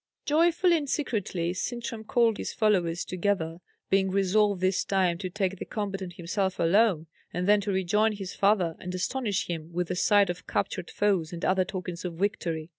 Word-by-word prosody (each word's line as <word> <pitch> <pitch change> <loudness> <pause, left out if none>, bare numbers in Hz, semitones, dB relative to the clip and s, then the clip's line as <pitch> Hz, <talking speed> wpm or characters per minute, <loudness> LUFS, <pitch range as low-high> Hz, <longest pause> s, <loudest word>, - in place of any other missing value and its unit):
Joyfully 340 +3 +3
and 290 -3 -4
secretly 195 - -1
Sintram 230 +2 -4
called 230 -1 +2
all - - -13
his - - -4
followers 180 -6 +1
together, 175 -3 -1 0.3
being 190 0 +3
resolved 200 +1 +2
this 185 +1 +1
time 185 -3 +1
to 185 -2 -4
take 190 0 -2
the - - -3
combat 200 -2 -4
on 185 - -4
himself 185 +2 -2
alone, 175 -1 +3 0.3
and 180 +2 -2
then 210 0 +5
to 200 - -2
rejoin 210 +4 +2
his 195 -3 -6
father, 195 -5 +2
and 180 +1 -5
astonish 205 +2 -1
him 165 -1 -5
with 175 0 -2
the 180 - -1
sight 200 0 +4
of 175 - -10
captured 190 -2 -2
foes 190 -6 0
and 170 -1 -4
other 185 0 +2
tokens 180 -2 -5
of 175 -2 -4
victory. 170 -4 -2
190 Hz, 190 wpm, -27 LUFS, 175-210 Hz, 0.3 s, then